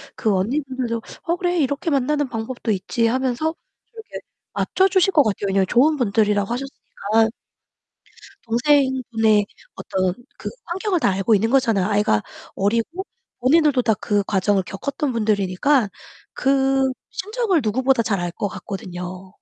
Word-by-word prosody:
그 215 - +1
언니분들도 250 +2 -2 0.2
"어, 340 +1 0
그래. 355 0 -1
이렇게 285 +3 0
만나는 290 +1 +1
방법도 225 0 -3
있지." 215 +4 0
하면서 260 +6 0
좀 - - -39 0.4
이렇게 445 -1 -8 0.3
맞춰 380 - +2
주실 380 0 +3
것 295 - +6
같아요. 205 -2 -1
왜냐하면 195 -1 +2
좋은 280 +9 +4
분들이라고 210 -3 +1
하셨으니까. 225 -4 -1 1.2
동생분의 235 -4 +2 0.3
어떤 185 -1 -1 0.2
그 - - -5 0.2
환경을 375 0 -1
다 200 - +3
알고 195 +4 +2
있는 220 +3 +2
거잖아요. 225 -8 +2
아이가 205 - +2 0.3
어리고 230 - -1 0.4
본인들도 285 0 +4
다 225 -2 +2
그 205 -2 +1
과정을 195 0 +1
겪었던 275 +9 -3
분들이니까 215 +3 +1 0.5
그 270 0 +2 0.2
심정을 420 -3 0
누구보다 255 +3 +2
잘 200 -4 -1
알 175 0 -2
것 205 - -3
같거든요. 185 -1 -7
235 Hz, 335 characters per minute, -21 LUFS, 205-280 Hz, 1.2 s, 것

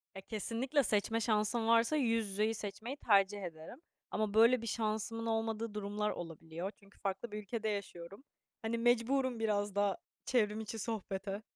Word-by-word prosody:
Ya, 195 - -6
kesinlikle 235 +8 0
seçme 225 +1 +1
şansım 220 +1 +1
varsa 230 +5 +5
yüz 230 -6 +2
yüzeyi 210 +3 +1
seçmeyi 220 +6 -5
tercih 200 -4 +3
ederim. 165 - -8 0.3
Ama 215 -2 0
böyle 230 +3 +6
bir 230 - -5
şansımın 220 +1 -1
olmadığı 225 -1 -1
durumlar 210 0 -1
olabiliyor 165 +2 -5
çünkü 200 0 -21
farklı 195 +3 -3
bir 210 - -4
ülkede 220 +1 -2
yaşıyorum. 200 +1 -5 0.4
Hani, 225 +1 -1
mecburum 240 +1 +2
biraz 205 -2 0
da 200 -2 +2 0.3
çevrim 215 -4 +2
içi 220 +1 -5
sohbete. 200 -2 -3
215 Hz, 150 wpm, -35 LUFS, 200-230 Hz, 0.4 s, böyle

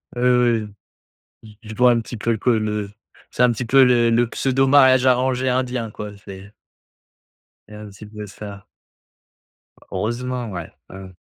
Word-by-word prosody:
Oui, 120 - -4
oui, 125 -2 +3 0.8
oui, 110 -1 -15
j 110 - -14
je 110 - -6
vois 125 +2 +5
un 120 -1 +1
petit 115 +1 -8
peu 115 +1 -1
que 125 - -1
le 105 -3 -1 0.4
c'est, 125 - +1
un 125 - +4
petit 120 +2 -4
peu, 135 +3 +5
le 120 -2 +3
le 120 +1 +2
pseudo 135 +2 0
mariage 130 -2 +5
arrangé 130 0 +1
indien 125 -2 -1
quoi, 105 0 -8
c'est 95 +1 -11 1.2
C'est 105 - -12
un 105 0 -10
petit 100 +2 -13
peu 105 0 -9
ça. 100 -1 -10 1.3
Heureusement, 120 +4 -3
ouais, 90 -2 -7 0.2
ouais, 95 - -10
ouais. 95 -1 -11
115 Hz, 170 wpm, -21 LUFS, 105-125 Hz, 1.3 s, vois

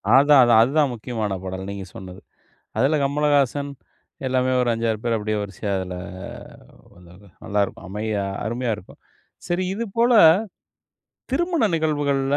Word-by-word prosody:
அதான் 140 0 +7
அதான், 120 -2 +5
அதுதான் 140 +2 +2
முக்கியமான 110 -4 -3
பாடல் 95 +1 -5
நீங்க 100 -1 -6
சொன்னது. 95 -1 -10 0.6
அதுல 140 +4 +3
'கமலஹாசன்' 145 0 +1 0.5
எல்லாமே 130 0 +1
ஒரு 125 - +1
5,6 115 -1 -1
பேர் 115 -1 +1
அப்படியே 110 0 -2
வரிசையா 100 +1 -5
அதுல 90 -1 -5 1.0
வந்தாங்க. 90 +3 -17 0.2
நல்லா 105 +1 0
இருக்கும் 100 - -9
அமையா 105 0 -2 0.2
அருமையா 120 +2 -2
இருக்கும். 100 - -15 0.5
சரி 175 +2 -1
இது 230 +3 -3
போல, 235 +2 +4 1.2
திருமண 335 0 +1
நிகழ்வுகள்ல, 145 -3 0
120 Hz, 130 wpm, -22 LUFS, 105-145 Hz, 1.2 s, அதான்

